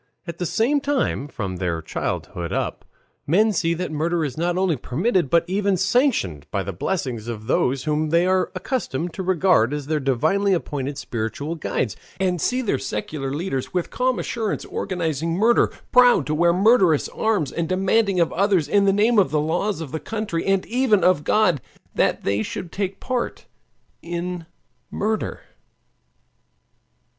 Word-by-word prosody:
At 170 -1 -7
the 180 - -1
same 270 - +1
time 270 - 0
from 95 -9 -5
their 90 -3 -1
childhood 85 +1 -4
up - - -3 0.4
men 210 +8 +3
see 165 -2 +1
that 180 0 -4
murder 160 +2 0
is 130 -4 -4
not 175 +2 0
only 185 -3 +2
permitted, 170 - 0
but 170 +3 +4
even 195 +1 +1
sanctioned 190 - +1
by 100 - -1
the 100 - -5
blessing 130 - -2
of 110 -2 -6
those 130 +2 +1
whom 155 0 0
they 170 +2 +3
are 185 0 +1
accustomed 180 - -3
to 195 - -5
regard 180 -8 +3
as 145 -2 -5
their 155 +1 0
divinely 160 +10 +1
appointed 145 -5 -3
spiritual 125 +5 -4
guides, 140 -7 -2 0.2
and 180 -3 0
see 255 +1 0
their 165 - 0
secular 135 +5 -4
leaders 145 0 -3
with 180 - -1
calm 255 0 0
assurance 225 -3 -2
organizing 165 -4 -2
murder, 225 +5 +3 0.2
proud 245 - +6
to 155 - -1
wear 170 +2 +4
murderous 185 - +4
arms, 205 - 0
and 165 -1 -2
demanding 195 +1 +2
of 170 - +2
others 190 -4 +2
in 200 +5 +3
the 195 - +5
name 215 +3 +3
of 190 - +3
the 150 +1 +1
laws 170 +4 -1
of 150 -5 -6
the 160 - -3
country, 210 -6 -3
and 195 -1 +2
even 235 -5 +2
of 180 -4 +3
God, 180 - +2 0.3
that - - +1
they 100 +2 0
should 165 +9 -5
take 195 -1 -3
part 255 -2 -3 0.6
in 175 0 -4 0.4
murder. 215 +1 -2
175 Hz, 165 wpm, -22 LUFS, 145-200 Hz, 0.6 s, proud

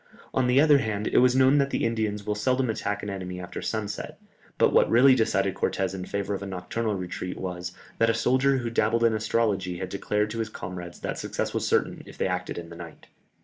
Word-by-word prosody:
On 130 -1 +2
the 125 +2 +4
other 145 -1 +6
hand, 110 -4 -2
it - - +3
was 125 0 +4
known 135 +2 +5
that 140 0 +2
the - - -1
Indians 110 -3 -1
will 105 - 0
seldom 125 +3 +1
attack 105 -1 -3
an 105 - -4
enemy 90 -2 -5
after 90 - -6
sunset, 105 -2 -4 0.4
but - - +3
what - - +5
really 130 +3 +7
decided 100 -5 +1
Cortès 95 -1 -1
in 95 -1 -5
favour 100 +1 -3
of 100 - -4
a 100 - -5
nocturnal 100 +4 -3
retreat 90 0 -5
was, 90 -1 -5 0.3
that 115 - +4
a 115 - +2
soldier 130 +3 +2
who 120 -2 -3
dabbled 115 +1 +2
in 115 -1 +4
astrology 105 -4 0
had 95 +1 -5
declared 105 +1 -1
to 115 - -4
his 110 -1 -2
comrades 90 -3 -8
that - - -3
success - - -3
was - - -1
certain - - +1
if - - -12
they - - 0
acted - - -2
in 85 -1 -7
the 85 - -10
night. 85 0 -11
105 Hz, 230 wpm, -26 LUFS, 95-115 Hz, 0.4 s, really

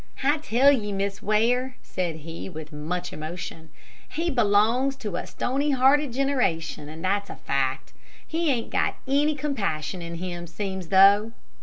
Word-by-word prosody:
"I 290 +3 +3
tell 275 0 +4
ye, 215 -7 0
Miss 200 0 -2
Ware," 245 +5 +1
said 175 -3 -3
he, 165 +3 -7
with 155 -3 -9
much 175 +4 -4
emotion, 160 +1 -7 0.4
"he 335 +2 -1
belongs 240 +3 +3
to 210 -8 -5
a - - -4
stony 275 +4 -1
hearted 275 +1 +4
generation, 230 - 0
and 160 +3 -7
that's 200 +2 0
a - - -6
fact. 135 -1 -2 0.3
He 330 0 0
ain't 235 -3 -2
got - - +1
any 290 +3 +2
compassion 200 - -2
in 170 0 -6
him, 175 0 -5
seems 190 +1 -4
though." 200 +4 +6
205 Hz, 155 wpm, -25 LUFS, 170-265 Hz, 0.4 s, though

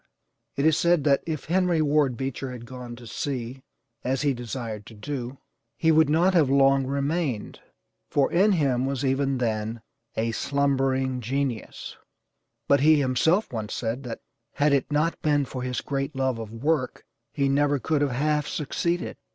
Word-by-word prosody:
It 140 - 0
is 160 -1 +4
said 170 -3 +3
that 140 -2 +3
if 155 -4 -3
Henry 180 0 +2
Ward 145 -4 +2
Beecher 135 0 -4
had 120 -2 -8
gone 125 0 -8
to 120 0 -12
sea, 130 +1 -4 0.4
as 130 +3 -1
he 145 -2 +2
desired 115 -3 -6
to 115 - -12
do, 130 +2 -5 0.4
he 160 - +3
would 160 -1 +4
not 170 +5 +3
have 160 -7 +4
long 135 -1 +4
remained, 140 -3 -2 0.5
for 140 -2 +2
in 195 +4 +4
him 135 -6 +1
was 135 0 -2
even 135 0 +1
then 110 -1 -2 0.3
a 115 +1 0
'slumbering 135 0 0
genius,' 130 -1 -3 0.7
But 140 - +5
he 155 +2 +5
himself 145 - +2
once 110 -2 -4
said 115 +2 -2
that 115 - -6 0.3
had 145 0 +2
it 140 +1 +1
not 155 +3 0
been 145 -2 +2
for 130 0 -6
his 125 0 -2
great 140 +1 -3
love 130 -3 0
of 110 -2 -7
work 130 +3 -1 0.3
he 140 -2 0
never 145 +1 +2
could 150 +2 0
have 145 - +2
half 150 +3 0
succeeded. 170 +4 -2
135 Hz, 165 wpm, -25 LUFS, 125-150 Hz, 0.7 s, But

